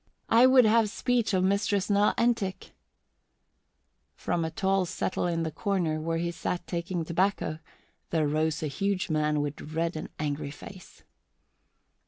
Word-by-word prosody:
I 235 +3 +7
would 260 -2 +6
have 220 0 +4
speech 240 0 0
of 185 -2 +2
Mistress 200 0 +1
Nell 205 0 +3
Entick." 230 -5 0 1.4
From 170 - -1
a 160 - -1
tall 195 -1 0
settle 185 0 -2
in 165 -1 -1
the 160 - -3
corner, 170 -3 -1
where 165 +1 -1
he 170 +1 -1
sat 175 0 -4
taking 170 -1 -3
tobacco, 175 -2 0 0.5
there 155 -3 +1
rose 155 +1 0
a - - 0
huge 190 +5 -1
man 150 -1 +1
with 145 0 -4
red 165 +2 -2
and 155 - -5
angry 145 -1 -3
face. 180 +6 -12
175 Hz, 150 wpm, -28 LUFS, 155-200 Hz, 1.4 s, I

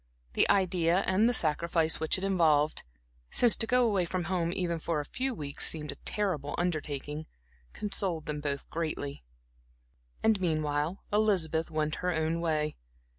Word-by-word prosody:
The - - +3
idea 180 -2 +3
and 205 +5 +3
the - - +1
sacrifice 160 0 +1
which 160 +3 +2
it 185 - -6
involved 160 -6 +3 0.5
(since 240 -3 +5
to 225 - +2
go 250 0 +4
away 195 -5 +1
from 180 +1 -2
home, 170 -1 -1
even 175 -3 -2
for 160 -1 -1
a 145 - -4
few 255 - -3
weeks, 145 -5 +1
seemed 150 -2 -3
a - - -8
terrible 165 -9 -1
undertaking) 155 -3 -3 0.4
consoled 190 -6 -1
them 150 -2 -4
both 140 -1 -3
greatly. 155 - -4 1.0
And 220 -3 +3
meanwhile 155 0 -1
Elizabeth 180 -7 +1
went 155 -1 -1
her 180 0 0
own 160 +1 0
way. 155 -2 -1
165 Hz, 155 wpm, -30 LUFS, 155-190 Hz, 1.0 s, since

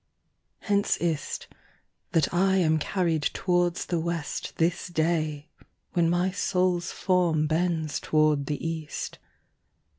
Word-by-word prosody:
Hence 200 -1 +1
is't, 165 -3 -2 0.7
that 160 -1 +2
I 190 +2 +3
am 160 -4 +3
carryed 165 -2 0
towards 175 -2 +1
the 170 -2 -1
WestThis 170 +1 -2
day, 155 -3 0 0.4
when 170 -2 +3
my 175 +2 +1
Soules 180 -2 0
forme 175 -5 +2
bends 160 -1 0
toward 155 -2 +2
the 150 +2 -2
East. 160 -2 -5
170 Hz, 110 wpm, -27 LUFS, 155-180 Hz, 0.7 s, I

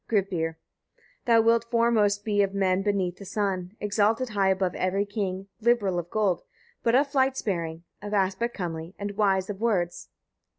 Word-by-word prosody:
Gripir. 180 -6 0 0.4
7. - - -33 0.2
Thou 230 -2 +5
wilt 230 +1 +3
foremost 220 -4 +2
be 205 -2 +2
of 200 0 0
men 190 -1 +2
beneath 195 -3 0
the - - -10
sun, 195 -1 -2
exalted 215 +4 +1
high 200 -3 +2
above 190 -1 +1
every 195 +2 0
king; 195 -2 -3
liberal 215 -6 +2
of 175 0 -6
gold, 200 -5 +1 0.4
but 230 +1 +2
of 275 +3 +5
flight 270 -1 +1
sparing, 170 -6 -3 0.2
of 205 0 -6
aspect 200 +4 0
comely, 165 -1 -5
and 205 0 -4
wise 195 -2 +2
of 205 0 -6
words. 185 -7 -1
200 Hz, 170 wpm, -26 LUFS, 185-220 Hz, 0.4 s, Thou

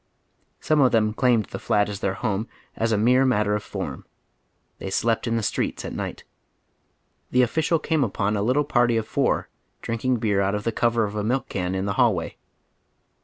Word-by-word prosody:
Some 155 -1 +2
of 130 -2 +5
them 110 -1 +2
claimed 120 -2 +2
the - - -7
"flat 105 -1 +1
"as 100 -1 -5
their 95 -1 -1
home 110 0 -2 0.3
as 115 0 0
a 110 - +2
mere 125 +5 +4
matter 105 -5 +2
of 105 - 0
form. - - -6 0.8
They 95 - -5
slept 115 +4 0
in 115 0 +1
the 115 - -2
streets - - -2
at - - -5
night. - - -5 1.1
The 125 0 +4
official 160 +6 +1
came 155 -1 0
upon 105 -2 -1
a 100 - 0
little 130 +7 +2
party 120 -4 +2
of 110 - -2
four - - 0 0.4
drinking 120 +2 0
beer 105 -3 +1
out 100 +1 +1
of 105 - -3
the 115 - 0
cover 115 0 +1
of 105 0 -3
a 105 - -1
milk 125 +5 -1
can 90 -1 -2
in 95 +1 -1
the 100 - -1
hallway. 105 -9 +1
115 Hz, 200 wpm, -24 LUFS, 105-125 Hz, 1.1 s, of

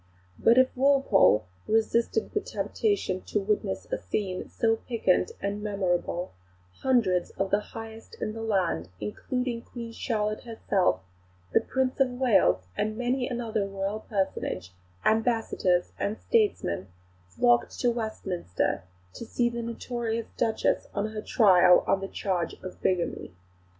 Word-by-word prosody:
But 235 - +5
if 260 0 +4
Walpole 265 - +4 0.2
resisted 225 0 +1
the 415 - +2
temptation 405 - -1
to 210 - 0
witness 195 - -1
a - - -1
scene 185 - -3
so 225 -1 +1
piquant 215 -7 +1
and 200 +1 -3
remarkable, 185 -3 -1 0.5
hundreds 220 -9 +2
of 195 0 -1
the 205 - +4
highest 225 - -10
in 215 - -2
the 225 - -6
land, 185 - 0
including 240 - -3
Queen 235 -1 -8
Charlotte 215 -2 -2
herself, 195 - 0 0.5
the - - +5
Prince 260 0 -1
of 270 -1 +4
Wales 95 - +4
and 215 +1 -1
many 250 +1 0
another 230 -5 -2
Royal 195 +2 -3
personage, 190 - -3 0.3
ambassadors 220 -5 +2
and 210 +2 -1
statesmen, 400 - +1 0.4
flocked 120 +6 +2
to 245 - +3
Westminster 200 - -2 0.3
to - - -7
see 240 +1 0
the 235 0 -4
notorious 230 -1 -3
Duchess 225 -2 +1
on 210 +1 -1
her 215 -1 -4
trial 185 -6 +6
on 195 - +2
the 195 - -3
charge 185 -4 -2
of 185 - -8
bigamy. 175 - -1
215 Hz, 135 wpm, -27 LUFS, 185-235 Hz, 0.5 s, trial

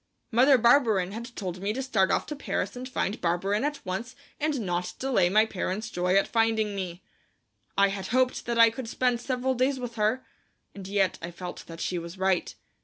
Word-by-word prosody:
Mother 260 +4 +6
Barberin 230 -6 +4
had 235 +3 -7
told 185 -3 -5
me 205 +2 -1
to 265 +3 -3
start 210 -8 +2
off - - +1
to 300 - -5
Paris 285 - -3
and 255 +1 -6
find 210 -4 -2
Barberin 190 +6 0
at 295 -3 -3
once 225 +7 -4 0.2
and 300 -2 0
not 180 -3 -2
delay 240 -10 +2
my 215 +3 +5
parent's 215 +2 -3
joy 180 +1 +1
at 195 - +4
finding 225 -2 +1
me. 185 -1 -5 0.7
I 200 0 +5
had 195 -1 -4
hoped 255 0 +1
that 235 -1 -1
I 230 -1 +7
could 230 0 -6
spend 245 -1 +1
several 260 0 -1
days 260 +2 +1
with 245 -2 -6
her, 220 +5 +1 0.5
and 195 -2 -9
yet 195 -2 +1
I 170 - -5
felt 180 +1 -8
that 165 0 -9
she 180 - -1
was 170 +2 -8
right. 190 -1 0
215 Hz, 200 wpm, -27 LUFS, 190-250 Hz, 0.7 s, I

